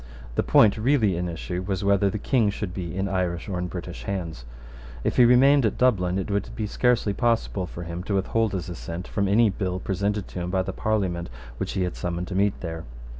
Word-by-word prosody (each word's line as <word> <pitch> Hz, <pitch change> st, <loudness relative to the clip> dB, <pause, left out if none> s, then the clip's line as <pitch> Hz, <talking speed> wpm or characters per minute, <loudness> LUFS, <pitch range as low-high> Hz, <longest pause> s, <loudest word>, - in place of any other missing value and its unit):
The -, -, +1 dB
point 105 Hz, -2 st, +5 dB
really 110 Hz, -5 st, +3 dB
in 90 Hz, +1 st, -2 dB
issue 90 Hz, +2 st, -4 dB
was 95 Hz, 0 st, -2 dB
whether 100 Hz, 0 st, +3 dB
the 110 Hz, -, -3 dB
King 110 Hz, 0 st, +2 dB
should 100 Hz, -2 st, -4 dB
be 85 Hz, -2 st, -5 dB
in 95 Hz, +1 st, 0 dB
Irish 90 Hz, -3 st, -1 dB
or 95 Hz, -3 st, -2 dB
in 90 Hz, -, -2 dB
British 90 Hz, 0 st, -7 dB
hands. 85 Hz, -11 st, -4 dB, 0.6 s
If -, -, -1 dB
he 125 Hz, -, +8 dB
remained 135 Hz, +3 st, +6 dB
at 110 Hz, -, +1 dB
Dublin, 95 Hz, -8 st, +2 dB
it 95 Hz, +1 st, -3 dB
would 100 Hz, 0 st, -1 dB
be 110 Hz, -, -2 dB
scarcely 115 Hz, -1 st, +1 dB
possible 115 Hz, -5 st, 0 dB
for 85 Hz, -, -7 dB
him 85 Hz, +1 st, -5 dB
to 100 Hz, -, -1 dB
withhold 110 Hz, +3 st, +1 dB
his 90 Hz, -3 st, -3 dB
assent 85 Hz, 0 st, -6 dB
from 100 Hz, -2 st, 0 dB
any 105 Hz, +2 st, +4 dB
bill 95 Hz, -2 st, -2 dB
presented 100 Hz, +1 st, -1 dB
to -, -, -6 dB
him 90 Hz, 0 st, -3 dB
by 95 Hz, 0 st, +1 dB
the 95 Hz, 0 st, -4 dB
Parliament 95 Hz, -6 st, -1 dB, 0.3 s
which -, -, -3 dB
he 95 Hz, -, 0 dB
had 90 Hz, -, -3 dB
summoned 90 Hz, 0 st, -3 dB
to 95 Hz, -, -4 dB
meet 100 Hz, +1 st, +1 dB
there. 80 Hz, -2 st, -5 dB
95 Hz, 225 wpm, -25 LUFS, 90-105 Hz, 0.6 s, he